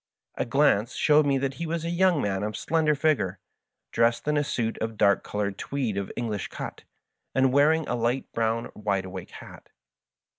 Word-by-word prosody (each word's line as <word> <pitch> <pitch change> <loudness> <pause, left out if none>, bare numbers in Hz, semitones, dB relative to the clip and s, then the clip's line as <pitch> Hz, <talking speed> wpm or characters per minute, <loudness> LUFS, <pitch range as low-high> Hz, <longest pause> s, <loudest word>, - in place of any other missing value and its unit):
A - - -2
glance 125 -3 +2
showed 150 -1 +4
me 140 -1 +3
that 135 0 -1
he 170 - -2
was 165 0 -2
a 170 - -2
young 175 -3 +3
man 95 -1 -1
of 105 +1 -3
slender 155 -2 +1
figure, 140 - +1 0.5
dressed 115 +3 +1
in 150 - +2
a 145 - +2
suit 115 -5 -2
of 110 -1 -3
dark 100 -2 +3
^solored 100 -1 -3
tweed, 130 -7 -2
of 100 -1 -3
Engh'sh 110 -4 -3
cut, - - -7 0.5
and 130 -1 +3
wearing 155 +2 +4
a - - -1
light 120 +2 0
brown 115 0 -1
wide 100 -2 -1
awake 95 -1 -8
hat. - - -12
120 Hz, 185 wpm, -26 LUFS, 105-150 Hz, 0.5 s, showed